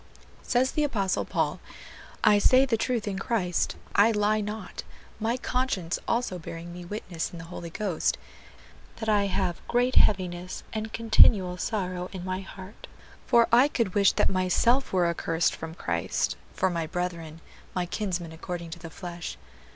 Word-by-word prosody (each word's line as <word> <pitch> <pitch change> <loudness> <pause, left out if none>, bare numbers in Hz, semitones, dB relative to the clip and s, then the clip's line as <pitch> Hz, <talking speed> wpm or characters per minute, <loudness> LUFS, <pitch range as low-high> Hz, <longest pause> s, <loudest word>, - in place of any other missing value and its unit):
Says 255 +2 +1
the 300 - 0
Apostle 200 -10 0
Paul, - - -1 0.6
"I 205 -1 +6
say 255 +6 +5
the 255 -4 +1
truth 225 -1 -1
in 195 -2 -2
Christ, 185 -6 0 0.2
I 205 +3 +6
lie 210 0 +2
not, 210 -3 -5 0.4
my 230 +3 0
conscience 250 -10 -1
also 230 -6 0
bearing 165 +1 -8
me 175 0 -8
witness 175 -3 -4
in 175 - -9
the 165 - -8
Holy 170 - -6
Ghost, 185 -2 -1 0.8
that 220 - -6
I 205 -2 +3
have 185 -3 -1
great 245 +1 +1
heaviness 180 -2 +2
and 220 0 -3
continual 210 -5 +5
sorrow 180 -3 -2
in 185 -1 -6
my 185 0 -2
heart, 190 +1 -11 0.4
for 235 -2 +5
I 245 +4 +7
could 230 -10 -1
wish 200 -1 +4
that - - +2
myself 195 +8 +2
were 180 -2 +3
accursed 165 0 0
from 160 0 -7
Christ, - - -1 0.2
for 190 - 0
my 165 -2 -2
brethren, 170 -2 -4 0.4
my 180 -1 0
kinsmen 175 -3 -3
according 170 +1 -6
to 170 - -7
the 165 - -8
flesh.... 175 0 -7
190 Hz, 160 wpm, -27 LUFS, 175-220 Hz, 0.8 s, I